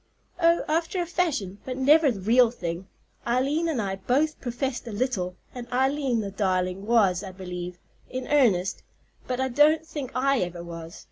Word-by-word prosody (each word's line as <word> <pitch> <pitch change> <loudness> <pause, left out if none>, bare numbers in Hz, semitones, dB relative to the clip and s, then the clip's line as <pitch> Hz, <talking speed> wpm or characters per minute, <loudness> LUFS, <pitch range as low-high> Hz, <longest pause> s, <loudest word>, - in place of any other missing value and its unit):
"Oh, 335 0 +4
after 330 +4 0
a 350 - 0
fashion, 295 - -1
but 255 -1 -5
never 290 +3 +5
the 220 -6 -3
real 235 +4 +5
thing. 175 -5 -5 0.4
Eileen 275 +7 +1
and 295 -7 -1
I 195 -2 -2
both 290 +9 0
professed 250 0 -3
a - - -5
little, 205 -6 -1 0.2
and 240 -1 -8
Eileen, 265 -1 +1
the 200 -2 -5
darling, 190 0 -1
was, 200 -6 +3
I 190 - -6
believe, 180 -1 -6 0.3
in 255 0 -5
earnest; 210 -11 +3 0.5
but 250 0 -2
I 265 - +1
don't 305 +5 +4
think 290 -5 -5
I 275 +1 +2
ever 175 -2 -3
was. 165 -1 -8
245 Hz, 175 wpm, -26 LUFS, 190-280 Hz, 0.5 s, never